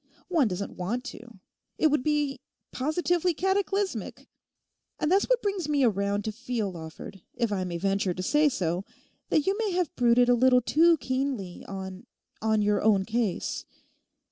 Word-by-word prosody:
One 320 Hz, -9 st, +3 dB
doesn't 195 Hz, 0 st, -4 dB
want 225 Hz, +8 st, -2 dB
to. 235 Hz, -3 st, -13 dB, 0.4 s
It 310 Hz, -, +3 dB
would 300 Hz, -, +2 dB
be 295 Hz, -2 st, 0 dB, 0.3 s
positively 345 Hz, +5 st, 0 dB
cataclysmic. 390 Hz, +2 st, -1 dB, 0.7 s
And 305 Hz, -, 0 dB
that's 390 Hz, +5 st, +3 dB
what -, -, +2 dB
brings 395 Hz, -7 st, -1 dB
me 290 Hz, -2 st, +2 dB
around 200 Hz, -2 st, +1 dB
to 220 Hz, -, -1 dB
feel, 230 Hz, -3 st, -3 dB
Lawford, 165 Hz, +3 st, -9 dB
if 235 Hz, -3 st, 0 dB
I 190 Hz, -2 st, -1 dB
may 175 Hz, -1 st, -3 dB
venture 195 Hz, 0 st, 0 dB
to 185 Hz, -, -4 dB
say 295 Hz, +8 st, +3 dB
so, 180 Hz, -7 st, -1 dB, 0.5 s
that 305 Hz, -, +2 dB
you 390 Hz, -, +2 dB
may 425 Hz, -4 st, 0 dB
have 355 Hz, -4 st, -1 dB
brooded 245 Hz, 0 st, +4 dB
a 245 Hz, -, +5 dB
little 250 Hz, +1 st, +5 dB
too 330 Hz, +5 st, +4 dB
keenly 260 Hz, -8 st, -3 dB
on—on 195 Hz, +3 st, -4 dB
your 205 Hz, -1 st, +2 dB
own 200 Hz, -3 st, +3 dB
case. 225 Hz, -4 st, -2 dB
245 Hz, 160 wpm, -27 LUFS, 200-310 Hz, 0.7 s, a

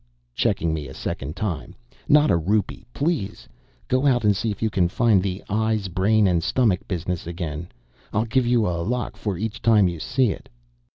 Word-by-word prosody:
checking 80 Hz, +6 st, 0 dB
me 75 Hz, -3 st, -4 dB
a 65 Hz, -, -10 dB
second 70 Hz, +3 st, -4 dB
time 100 Hz, -7 st, -4 dB, 0.3 s
"not 150 Hz, +1 st, +5 dB
a -, -, +4 dB
rupee, 100 Hz, +6 st, -1 dB
please. 140 Hz, -, -2 dB, 0.4 s
Go 130 Hz, +2 st, +2 dB
out 125 Hz, -4 st, +3 dB
and 105 Hz, -1 st, +4 dB
see 115 Hz, +4 st, -1 dB
if 100 Hz, -, -4 dB
you 110 Hz, -, +1 dB
can 90 Hz, -4 st, +2 dB
find 110 Hz, -1 st, +3 dB
the 95 Hz, 0 st, -3 dB
eyes 110 Hz, -2 st, 0 dB
brain 105 Hz, +4 st, +3 dB
and 85 Hz, -2 st, +2 dB
stomach 110 Hz, 0 st, +1 dB
business 90 Hz, -2 st, -3 dB
again. 85 Hz, -2 st, -5 dB, 0.4 s
I'll 110 Hz, +2 st, +1 dB
give 120 Hz, +2 st, +1 dB
you 120 Hz, -3 st, +3 dB
a 85 Hz, -2 st, -1 dB
lakh 120 Hz, +6 st, -2 dB
for 100 Hz, -5 st, -3 dB
each 110 Hz, +3 st, -4 dB
time 110 Hz, -4 st, +5 dB
you 85 Hz, -2 st, -4 dB
see 125 Hz, -, +1 dB
it." -, -, -9 dB
105 Hz, 190 wpm, -23 LUFS, 85-115 Hz, 0.4 s, not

